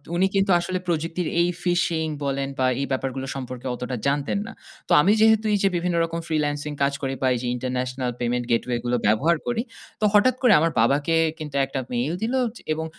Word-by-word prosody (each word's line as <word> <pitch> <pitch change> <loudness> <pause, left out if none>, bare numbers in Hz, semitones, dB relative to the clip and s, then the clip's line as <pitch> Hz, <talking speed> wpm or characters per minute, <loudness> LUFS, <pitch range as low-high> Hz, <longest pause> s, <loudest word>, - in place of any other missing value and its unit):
উনি 185 +2 +3
কিন্তু 195 0 +2
আসলে 185 +2 -2
প্রযুক্তির 165 +1 -1
এই 170 - +3 0.2
fishing 175 -3 +1 0.2
বলেন 135 0 -1
বা 130 - +3 0.2
এই - - 0
ব্যাপারগুলো 135 0 -2
সম্পর্কে 130 -1 -6
অতটা 125 +1 -4
জানতেন 145 +7 0
না। - - -7 0.4
তো - - -8
আমি 190 - +4
যেহেতু 220 0 +5
এই - - +4
যে - - +5
বিভিন্ন 175 0 0
রকম 165 0 -4
freelancing 150 -1 -1
কাজ 140 0 +2
করি 135 -1 -2
বা 130 - +2
এই 125 - -1
যে 125 - -3
international 125 0 -2
payment 120 0 -1
gateway 120 +1 +1
গুলো 120 0 +1
ব্যবহার 150 +11 +3
করি। 240 -2 0 0.4
তো - - +3
হঠাৎ 225 +5 +5
করে 245 -5 +6
আমার 165 +2 +2
বাবাকে 145 +7 +2 0.2
কিন্তু 150 -2 -7
একটা 135 0 -4
mail 125 +7 -1
দিলো 255 +4 0 0.3
এবং 160 +1 -4
150 Hz, 200 wpm, -24 LUFS, 130-175 Hz, 0.4 s, করে